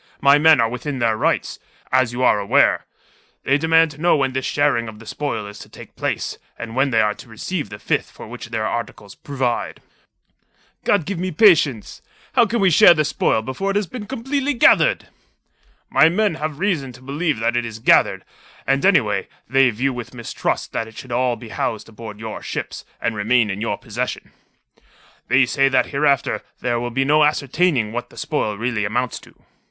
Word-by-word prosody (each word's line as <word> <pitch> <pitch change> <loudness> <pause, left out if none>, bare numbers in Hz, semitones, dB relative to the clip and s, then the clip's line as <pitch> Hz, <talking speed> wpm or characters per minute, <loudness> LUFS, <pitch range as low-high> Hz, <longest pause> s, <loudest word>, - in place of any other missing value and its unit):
My 140 +1 +5
men 160 -2 +6
are 115 - +3
within 130 +4 -5
their 115 -3 +1
rights, - - -1 0.3
as 130 -2 +2
you 125 +1 -3
are 105 - +4
aware. 100 - +2 0.6
They 140 +2 +2
demand 160 0 +3
to 150 +1 -13
know 175 0 +4
when 135 -3 0
this 130 0 -2
sharing 145 -5 +1
of 110 -1 -9
the 115 - -14
spoil 115 -7 -4
is 105 0 -10
to - - -12
take - - -13
place, - - -3 0.2
and 115 0 -7
when 135 +2 +2
they 115 -3 +3
are 105 -1 +1
to 120 - -14
receive 125 - -4
the 100 - -8
fifth - - -1
for - - -12
which 120 +1 -9
their 110 -2 -2
articles 105 -3 -5
provide." 130 -4 -3 1.1
"God 200 -7 +2
give 195 -3 -4
me 185 +1 -2
patience! 155 - +3 0.3
How 240 -3 +4
can 235 +3 -1
we 190 -2 +4
share 170 - +7
the 155 -1 +1
spoil 110 -5 0
before 130 - -3
it 195 - -1
has 205 0 +1
been 210 +1 -8
completely 270 +3 -2
gathered?" - - +4 0.8
"My 160 - +5
men 205 +2 +1
have 155 -2 -4
reason 170 -9 -1
to 125 - -15
believe 145 +2 -1
that 115 +1 0
it 120 - +1
is 115 -1 -6
gathered; 115 - +3 0.4
and, 135 0 +1
anyway, 110 - +2 0.2
they 135 +1 +4
view 125 +4 -1
with 120 +1 -8
mistrust 120 -2 -3
that 115 - -2
it 110 - -15
should 130 - -9
all 125 0 +1
be 120 -1 -11
housed 110 0 -3
aboard 110 -1 -10
your 110 -1 -6
ships, - - -6
and 115 - -2
remain 110 +1 +2
in 100 +2 -5
your 105 -3 -2
possession. 120 +3 -5 1.0
They 130 +1 +4
say 135 +2 +2
that 135 - +2
hereafter 140 -1 +1 0.2
there 120 -1 -1
will 120 +1 -3
be 135 +3 0
no 150 +2 +4
ascertaining 145 -4 +1
what 120 +1 -5
the - - -18
spoil 110 -9 -2
really 115 -1 -1
amounts 120 +4 -2
to." - - -19
130 Hz, 200 wpm, -20 LUFS, 115-155 Hz, 1.1 s, share